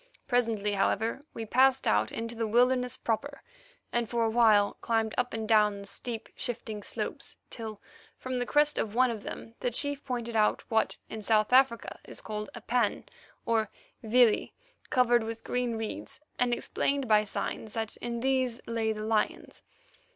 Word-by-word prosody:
Presently, 225 Hz, -5 st, +1 dB
however, 225 Hz, +7 st, 0 dB
we 225 Hz, -, -4 dB
passed 260 Hz, +4 st, +4 dB
out 105 Hz, +1 st, +2 dB
into 230 Hz, +1 st, -4 dB
the 225 Hz, -1 st, -2 dB
wilderness 250 Hz, +2 st, +2 dB
proper, 275 Hz, +5 st, -3 dB, 0.5 s
and 240 Hz, -1 st, +1 dB
for 235 Hz, -1 st, +1 dB
a 225 Hz, -, +1 dB
while 220 Hz, -3 st, +5 dB
climbed 225 Hz, -2 st, 0 dB
up 250 Hz, 0 st, 0 dB
and 220 Hz, -1 st, -3 dB
down 210 Hz, -2 st, +4 dB
the -, -, -9 dB
steep, 230 Hz, +3 st, -4 dB
shifting 225 Hz, -3 st, -4 dB
slopes, -, -, -4 dB
till 220 Hz, -3 st, -6 dB, 0.4 s
from 255 Hz, -1 st, -3 dB
the 245 Hz, -, -2 dB
crest 295 Hz, 0 st, +3 dB
of 215 Hz, 0 st, -2 dB
one 255 Hz, 0 st, +4 dB
of 220 Hz, -3 st, -5 dB
them 225 Hz, -, -8 dB
the -, -, 0 dB
chief 285 Hz, +4 st, -2 dB
pointed 240 Hz, -3 st, -4 dB
out 215 Hz, -1 st, +2 dB
what 220 Hz, 0 st, +2 dB
in 220 Hz, -, -6 dB
South 215 Hz, +2 st, +2 dB
Africa 255 Hz, -3 st, +3 dB
is -, -, -7 dB
called 210 Hz, -1 st, -5 dB
a -, -, -8 dB
pan, 240 Hz, -3 st, 0 dB, 0.4 s
or 220 Hz, -2 st, +1 dB, 0.3 s
vlei, 230 Hz, 0 st, +4 dB, 0.4 s
covered 240 Hz, -1 st, +4 dB
with 225 Hz, 0 st, -6 dB
green 245 Hz, -2 st, -1 dB
reeds, 220 Hz, -1 st, -5 dB, 0.2 s
and 245 Hz, 0 st, +2 dB
explained 275 Hz, +2 st, -1 dB
by 215 Hz, -1 st, +5 dB
signs 215 Hz, +1 st, -4 dB
that 220 Hz, -1 st, -3 dB
in 235 Hz, -1 st, -4 dB
these 260 Hz, -2 st, +1 dB
lay 225 Hz, -1 st, 0 dB
the 215 Hz, -1 st, -4 dB
lions. 220 Hz, -1 st, -1 dB
230 Hz, 170 wpm, -29 LUFS, 220-245 Hz, 0.5 s, while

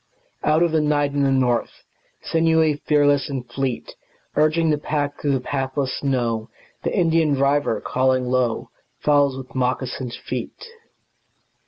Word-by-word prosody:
Out 155 Hz, +2 st, +3 dB
of 170 Hz, -, +2 dB
the 160 Hz, -1 st, +2 dB
night 145 Hz, -1 st, +1 dB
and 140 Hz, 0 st, 0 dB
the 135 Hz, -, +3 dB
north, 125 Hz, -3 st, 0 dB, 0.4 s
Sinewy, 160 Hz, -2 st, +2 dB
fearless 145 Hz, -1 st, +3 dB
and 130 Hz, -3 st, -4 dB
fleet, 130 Hz, 0 st, -3 dB, 0.4 s
Urging 155 Hz, +1 st, +3 dB
the 150 Hz, -, +1 dB
pack 145 Hz, -1 st, -2 dB
through 145 Hz, -1 st, +1 dB
the 135 Hz, -, +1 dB
pathless 135 Hz, +1 st, -2 dB
snow, 120 Hz, -4 st, -1 dB, 0.3 s
The -, -, -2 dB
Indian 165 Hz, -4 st, +3 dB
driver, 140 Hz, -2 st, +1 dB
calling 130 Hz, 0 st, +1 dB
low, 125 Hz, -2 st, 0 dB, 0.3 s
Follows 145 Hz, -2 st, +3 dB
with 130 Hz, -1 st, -9 dB
moccasined 125 Hz, -1 st, -2 dB
feet. -, -, -5 dB
140 Hz, 140 wpm, -22 LUFS, 130-150 Hz, 0.4 s, Out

